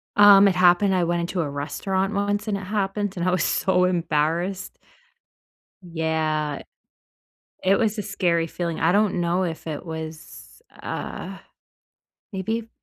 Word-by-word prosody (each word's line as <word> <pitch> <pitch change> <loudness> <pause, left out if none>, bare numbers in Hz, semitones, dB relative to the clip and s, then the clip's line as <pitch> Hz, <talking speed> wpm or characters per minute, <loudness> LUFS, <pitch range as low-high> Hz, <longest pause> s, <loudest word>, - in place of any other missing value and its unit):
Um, 205 -1 +8
it 185 - +2
happened 180 +2 +4
I 180 - +2
went 170 0 0
into 175 +1 -2
a 150 - -2
restaurant 190 +8 -2
once, 205 +1 -1
and 200 -2 0
it - - -7
happened, 200 0 -2
and 175 +1 -1
I 185 - +3
was 180 -3 +1
so 180 -1 +2
embarrassed. 175 +2 -1 1.0
Yeah. 160 -3 -2 1.0
It 195 +1 +3
was 220 -1 0
a - - -1
scary 175 -5 0
feeling, 170 0 -4
I 165 +2 +3
don't 200 -3 +2
know 175 +2 +1
if 165 -3 -4
it 155 0 -5
was, 160 - -9 0.2
uh, - - -6 0.9
maybe, 220 +4 -3
180 Hz, 145 wpm, -23 LUFS, 165-200 Hz, 1.0 s, Um